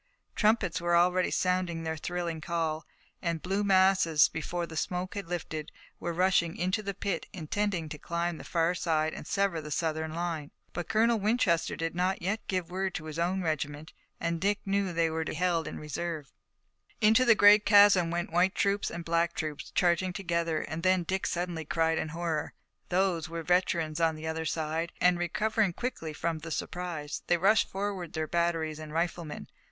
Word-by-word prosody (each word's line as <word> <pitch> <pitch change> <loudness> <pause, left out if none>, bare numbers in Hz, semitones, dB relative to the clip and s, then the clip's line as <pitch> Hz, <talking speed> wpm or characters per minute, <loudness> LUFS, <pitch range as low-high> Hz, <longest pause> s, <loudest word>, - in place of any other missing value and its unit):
Trumpets 210 -6 +2
were 175 0 +2
already 180 +1 +3
sounding 180 -2 0
their 160 0 -2
thrilling 170 0 -3
call, 160 -2 -2 0.3
and 170 -1 -1
blue 195 +3 0
masses, 185 -5 +4
before 170 +2 -3
the 165 - -10
smoke 180 +3 -2
had 200 -4 -5
lifted, 155 -3 -4 0.3
were 170 - -3
rushing 180 -1 +2
into 185 +5 0
the 200 -2 -4
pit, 195 -3 -3
intending 185 0 -2
to 150 -1 -8
climb 170 0 -2
the - - -8
far 170 0 +1
side 160 -3 0
and - - -8
sever 195 -5 0
the 150 - -8
Southern 160 0 -2
line. 165 -4 -3 0.2
But 175 -1 -5
Colonel 225 +1 +3
Winchester 205 -5 +1
did 165 0 -3
not 185 +2 0
yet 200 +5 -2
give 185 -2 -1
the 175 - -14
word 190 0 -1
to 160 - -5
his 155 +1 -6
own 180 +2 0
regiment, 155 -1 -3 0.3
and 170 0 -2
Dick 200 +1 +2
knew 200 0 +1
that 180 - -4
they 165 -1 +1
were 160 0 -1
to - - -4
be - - -6
held 170 -2 +1
in - - -6
reserve. 155 -1 -5 0.7
Into 220 +3 +5
the 235 -3 +6
great 205 0 +7
chasm 200 -4 +6
went 170 0 -2
white 180 +2 +3
troops 200 0 +1
and 170 0 -6
black 170 0 +1
troops, 155 -2 -4
charging 180 +1 +1
together, 170 -3 -1
and 160 +1 -5
then 185 0 +3
Dick 190 +3 -1
suddenly 175 -2 -2
cried 160 +1 +1
in 155 - -3
horror. 165 -1 -3 0.3
Those 180 -3 +1
were 165 0 -5
veterans 170 -3 +1
on 165 -1 +3
the 155 +1 -8
other 160 0 -2
side, 160 +2 -2
and, 180 0 +4
recovering 210 +3 +1
quickly 175 -8 -4
from 165 +1 -2
the 165 +2 -8
surprise, 165 -2 -4
they 175 - +3
rushed 205 +6 +3
forward 195 -4 -4
their 160 -1 -1
batteries 165 -2 0
and 155 -1 -8
riflemen. 165 -1 -3
170 Hz, 190 wpm, -29 LUFS, 160-185 Hz, 0.7 s, great